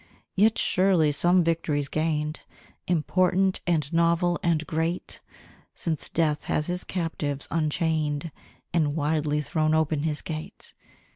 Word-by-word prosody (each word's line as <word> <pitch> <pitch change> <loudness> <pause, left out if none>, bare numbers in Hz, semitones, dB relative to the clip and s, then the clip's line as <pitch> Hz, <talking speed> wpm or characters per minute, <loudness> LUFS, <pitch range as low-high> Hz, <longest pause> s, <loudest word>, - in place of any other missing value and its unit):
Yet 215 +3 +4
surely 180 -5 +3
some 175 +5 +3
victory's 160 -4 0
gained, 155 0 -1 0.5
Important, 185 +3 +2
and 155 -3 0
novel, 170 +1 +2
and 165 -2 +1
great, 165 +3 -2 0.6
Since 160 -3 -3
Death 155 -2 0
has 150 - 0
his 180 +1 -2
captives 155 -5 -3
unchained, 155 -1 0 0.4
And 155 -4 +1
widely 150 -1 0
thrown 155 +1 +1
open 155 -2 +1
his 150 -1 -2
gate! 155 -1 -7
160 Hz, 120 wpm, -26 LUFS, 150-170 Hz, 0.6 s, Yet